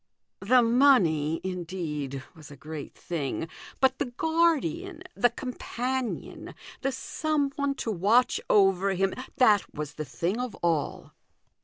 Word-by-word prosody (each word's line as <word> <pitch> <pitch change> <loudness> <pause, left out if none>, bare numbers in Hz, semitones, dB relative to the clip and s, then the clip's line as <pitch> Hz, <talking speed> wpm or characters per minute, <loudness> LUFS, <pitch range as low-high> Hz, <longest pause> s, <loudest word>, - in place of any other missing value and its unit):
The 245 +5 +4
money, 200 - +4
indeed, 165 -7 -4
was 155 -2 -13
a 145 - -11
great 150 +1 -8
thing, 160 -1 -3 0.3
but 265 - +3
the - - +1
guardian, 335 +6 0
the 245 - +3
companion, 250 0 -4 0.3
the 270 - 0
some 295 0 -1
one 280 -1 -1
to 230 - -3
watch 215 +7 +3
over 195 -1 +4
him, 195 +1 +1 0.2
that 215 -5 +4
was 150 -1 -5
the 155 - -5
thing 180 - -2
of 250 -2 -3
all. 165 -4 -1
210 Hz, 130 wpm, -27 LUFS, 165-265 Hz, 0.3 s, The